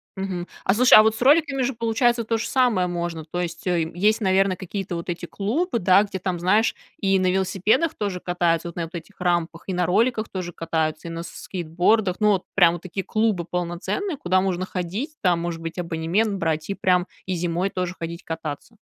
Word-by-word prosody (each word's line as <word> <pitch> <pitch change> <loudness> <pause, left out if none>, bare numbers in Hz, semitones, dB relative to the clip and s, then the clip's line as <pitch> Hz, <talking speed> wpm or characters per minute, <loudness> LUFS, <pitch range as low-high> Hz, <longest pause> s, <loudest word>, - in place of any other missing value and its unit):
Мгм. 190 -2 -4 0.2
А 190 - +3
слушай, 250 +3 +5
а 215 - +12
вот 220 0 +2
с 220 - -8
роликами 285 -1 +4
же 270 +2 0
получается 230 +1 +1
то 225 +1 0
же 220 - -3
самое 245 -8 +2
можно? 170 -2 -4
То 175 +3 -3
есть, 175 +4 -5
э, 175 -3 +1
мь 170 - -13
есть, 215 +5 +3
наверно, 190 -1 +3
какие-то 190 0 -5
вот 170 +1 -5
эти 175 0 -3
клубы, 235 - -1
да, 190 +1 +5
где 195 -2 -5
там, 180 -1 -2
знаешь, 205 +6 +2 0.3
и 195 -2 +3
на 185 -1 +2
велосипедах 195 - +1
тоже 200 -3 -3
катаются, 175 -1 0
вот 170 - -8
на 170 - -2
вот 165 - -8
этих 175 +4 -9
рампах, 175 -2 0
и 190 - -3
на 180 -1 0
роликах 225 +3 +1
тоже 180 -2 -5
катаются, 160 -1 -2
и - - -5
на 165 0 -5
с 170 - -8
скейтбордах. 180 +3 0
Ну, 210 - +3
вот 190 - -1
прям 175 -4 +5
вот 175 - -7
такие 190 +1 -4
клубы 215 -4 0
полноценные, 180 - -2
куда 185 -4 +2
можно 185 -1 -1
ходить, 200 - -4
там, 175 -3 +2
может 170 -1 -3
быть, 165 +1 -5
абонемент 175 +5 0
брать 160 -2 -1
и 200 - -1
прям 180 -1 +2 0.2
и 185 - -2
зимой 175 +2 -1
тоже 180 0 -3
ходить 170 +1 -6
кататься. 160 +5 -6
185 Hz, 215 wpm, -23 LUFS, 170-215 Hz, 0.3 s, а